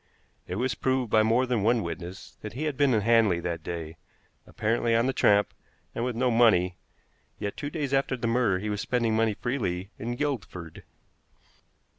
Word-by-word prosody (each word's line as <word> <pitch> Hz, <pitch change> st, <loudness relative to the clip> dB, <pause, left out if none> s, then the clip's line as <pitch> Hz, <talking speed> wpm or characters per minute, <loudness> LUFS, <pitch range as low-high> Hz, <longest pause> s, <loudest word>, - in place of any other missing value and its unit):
It 90 Hz, -, -4 dB
was 125 Hz, +5 st, 0 dB
proved 130 Hz, -3 st, -1 dB
by 110 Hz, -, +5 dB
more 115 Hz, +4 st, +3 dB
than 125 Hz, -4 st, 0 dB
one 115 Hz, +1 st, +2 dB
witness 85 Hz, +3 st, -7 dB
that 105 Hz, -, -7 dB
he 135 Hz, +6 st, -4 dB
had 150 Hz, -3 st, -1 dB
been 140 Hz, -3 st, +3 dB
in 110 Hz, -, +2 dB
Hanley 110 Hz, -5 st, +4 dB
that 85 Hz, -1 st, -3 dB
day, 80 Hz, -1 st, -6 dB, 0.5 s
apparently 115 Hz, +1 st, 0 dB
on 115 Hz, +1 st, +3 dB
the 135 Hz, -, +1 dB
tramp, 105 Hz, -3 st, +3 dB, 0.4 s
and 115 Hz, -, -3 dB
with 125 Hz, -1 st, -2 dB
no 125 Hz, +1 st, +1 dB
money, 95 Hz, -7 st, +4 dB, 0.6 s
yet 100 Hz, -1 st, -4 dB
two 145 Hz, -, -4 dB
days 145 Hz, -3 st, -3 dB
after 135 Hz, -1 st, +1 dB
the 115 Hz, -, -4 dB
murder 115 Hz, -5 st, +2 dB
he 105 Hz, +3 st, -3 dB
was 105 Hz, 0 st, -2 dB
spending 115 Hz, -3 st, 0 dB
money 110 Hz, -1 st, +2 dB
freely 100 Hz, -7 st, -3 dB
in 120 Hz, +2 st, -3 dB
Guildford. 110 Hz, -, -4 dB
115 Hz, 185 wpm, -27 LUFS, 100-125 Hz, 0.6 s, by